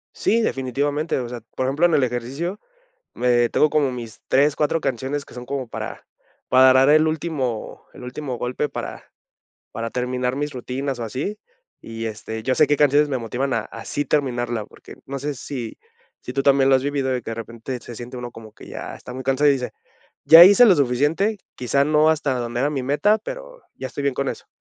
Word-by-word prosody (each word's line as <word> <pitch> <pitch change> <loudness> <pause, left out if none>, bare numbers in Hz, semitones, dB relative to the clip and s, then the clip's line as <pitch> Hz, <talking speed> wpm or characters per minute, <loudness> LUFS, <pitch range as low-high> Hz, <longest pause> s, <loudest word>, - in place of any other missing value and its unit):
Sí, 230 - +2
definitivamente, 145 - -1
o 125 - -3
sea, 120 0 -7
por 130 - -1
ejemplo, 145 +7 +3
en 170 - +2
el 140 - +3
ejercicio, 130 - -3 0.5
me 120 -1 +2
tengo 150 - +3
como 145 -3 +1
mis 115 -3 -8
3, 140 +2 +3
4 155 +2 +1
canciones 135 +3 -3
que - - -15
son 125 0 -7
como 130 -2 -4
para - - -7 0.4
para 130 0 +7
dar 130 +1 +5
el 155 +1 +5
último 150 -8 -3
el - - -13
último 125 0 -5
golpe 125 +5 -2
para - - -6 0.7
para 115 +1 -4
terminar 125 +1 -2
mis 145 +1 -3
rutinas 130 +1 -4
o - - -3
así 135 - -4 0.4
y, 115 0 -6
este, 110 0 -6
ya 130 - +1
sé 150 - +4
qué 145 - +2
canciones 145 +1 +4
me 130 - 0
motivan 125 +4 -2
a 110 - 0
a 115 - -10
sí 145 - -2
terminarla, 120 -6 -1
porque, - - -14
no 140 +1 -4
sé 145 +2 -3
si 125 -3 -6 0.4
si 125 - -7
tú 135 +1 -1
también 135 -1 +4
lo 135 - +6
has 130 - 0
vivido 140 -2 -1
de 130 -1 -1
que, 115 - -5
de - - -4
repente, 115 +2 -6
se 120 - -9
siente 120 +2 -8
uno 125 -1 -5
como 110 -2 -12
que - - -14
ya - - -7
está 125 - -10
muy 130 +1 -6
cansado, 135 +2 +3
y - - +5
dice: 125 -2 -3 0.5
"Ya 165 +2 +10
hice 205 +6 +8
lo 205 -6 +7
suficiente, 145 - +1 0.2
quizá 140 +3 +1
no 155 +1 +4
hasta 150 -4 +1
donde 120 0 -3
era 145 +3 +1
mi 140 -3 -2
meta, 175 +12 +2
pero - - -9
ya 130 - -6
estoy 145 - -6
bien 140 -2 0
con 140 0 -1
eso". - - -6
135 Hz, 215 wpm, -22 LUFS, 125-145 Hz, 0.7 s, Ya